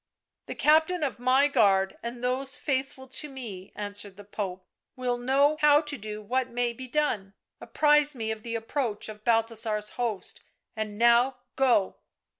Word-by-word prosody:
" -, -, -61 dB
The -, -, -5 dB
captain 315 Hz, +3 st, +3 dB
of 270 Hz, -5 st, -2 dB
my 260 Hz, +3 st, +4 dB
guard 200 Hz, -8 st, +3 dB
and 240 Hz, +1 st, -6 dB
those 260 Hz, +1 st, -1 dB
faithful 265 Hz, -1 st, -3 dB
to 295 Hz, +4 st, -4 dB
me," 215 Hz, -9 st, -8 dB
answered 205 Hz, -1 st, -6 dB
the 205 Hz, -, -10 dB
Pope, 190 Hz, -2 st, -5 dB, 0.2 s
" -, -, -61 dB
will 245 Hz, -1 st, -2 dB
know 280 Hz, +4 st, +3 dB
how 295 Hz, -1 st, +6 dB
to 295 Hz, -2 st, -5 dB
do 215 Hz, -2 st, -7 dB
what 255 Hz, +4 st, -1 dB
may 240 Hz, 0 st, -1 dB
be 255 Hz, +2 st, -8 dB
done 230 Hz, -9 st, -1 dB
— -, -, -53 dB
apprise 295 Hz, -1 st, +3 dB
me 220 Hz, -2 st, -3 dB
of 220 Hz, -1 st, -5 dB
the 230 Hz, +1 st, -5 dB
approach 225 Hz, -1 st, -2 dB
of 210 Hz, 0 st, -10 dB
Balthasar's 225 Hz, -2 st, 0 dB
host, 220 Hz, -5 st, -3 dB, 0.4 s
and 215 Hz, -1 st, -4 dB
now 235 Hz, +3 st, +4 dB, 0.2 s
go." 250 Hz, -8 st, +2 dB
240 Hz, 175 wpm, -27 LUFS, 215-270 Hz, 0.4 s, how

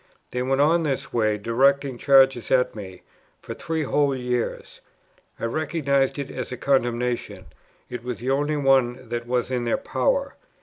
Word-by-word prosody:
They 125 Hz, -, -2 dB
went 135 Hz, +2 st, 0 dB
on 160 Hz, +4 st, +4 dB
in -, -, -2 dB
this 135 Hz, -3 st, -3 dB
way, 110 Hz, -3 st, +1 dB
directing 130 Hz, +4 st, +1 dB
charges 135 Hz, -3 st, +4 dB
at 125 Hz, -1 st, +2 dB
me, 95 Hz, -3 st, -9 dB, 0.4 s
for -, -, -7 dB
three 160 Hz, -1 st, -3 dB
whole 140 Hz, -1 st, +1 dB
years. 125 Hz, -2 st, -3 dB, 0.6 s
I -, -, -2 dB
recognized 140 Hz, 0 st, 0 dB
it 140 Hz, -2 st, -5 dB
as -, -, -5 dB
a 125 Hz, -, -4 dB
condemnation; 120 Hz, -6 st, -1 dB, 0.4 s
it 125 Hz, -2 st, -7 dB
was 125 Hz, -1 st, -4 dB
the 125 Hz, +3 st, -2 dB
only 145 Hz, +2 st, 0 dB
one 130 Hz, -3 st, +2 dB
that 120 Hz, 0 st, -4 dB
was 125 Hz, +1 st, -1 dB
in 125 Hz, -1 st, -1 dB
their 120 Hz, -, 0 dB
power. -, -, -1 dB
130 Hz, 170 wpm, -24 LUFS, 120-140 Hz, 0.6 s, on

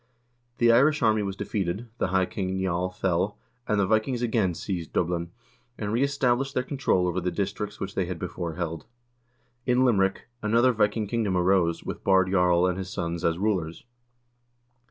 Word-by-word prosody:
The 120 Hz, -1 st, +5 dB
Irish 140 Hz, +5 st, +4 dB
army 110 Hz, -1 st, +3 dB
was 100 Hz, -1 st, -3 dB
defeated, 100 Hz, +1 st, -3 dB
the -, -, +1 dB
high 95 Hz, 0 st, +2 dB
king, 95 Hz, 0 st, -3 dB
Niall, 90 Hz, -1 st, -1 dB
fell, 95 Hz, +2 st, -1 dB, 0.3 s
and 105 Hz, -1 st, +1 dB
the 100 Hz, -, +3 dB
Vikings 110 Hz, +4 st, +1 dB
again 110 Hz, -7 st, +1 dB
seized 85 Hz, -2 st, -5 dB
Dublin, 85 Hz, 0 st, -1 dB, 0.5 s
and 105 Hz, 0 st, -3 dB
reestablished 135 Hz, 0 st, +1 dB
their 125 Hz, -, +1 dB
control 130 Hz, -10 st, +1 dB
over 90 Hz, +1 st, -1 dB
the 90 Hz, -, 0 dB
districts 100 Hz, +2 st, -3 dB
which 95 Hz, 0 st, -4 dB
they 95 Hz, -, 0 dB
had 90 Hz, 0 st, -4 dB
before 85 Hz, -2 st, -5 dB
held. 80 Hz, -3 st, -4 dB, 0.8 s
In 125 Hz, +1 st, +4 dB
Limerick 95 Hz, -5 st, +2 dB, 0.2 s
another 115 Hz, +4 st, +3 dB
Viking 105 Hz, -1 st, +1 dB
kingdom 105 Hz, -3 st, 0 dB
arose, 90 Hz, -2 st, +2 dB
with -, -, -6 dB
Baard 95 Hz, -1 st, +3 dB
Jarl 90 Hz, -2 st, +3 dB
and 90 Hz, 0 st, 0 dB
his 95 Hz, -1 st, -5 dB
sons 85 Hz, -1 st, -3 dB
as 85 Hz, 0 st, +1 dB
rulers. 90 Hz, -5 st, -1 dB
95 Hz, 170 wpm, -26 LUFS, 90-110 Hz, 0.8 s, The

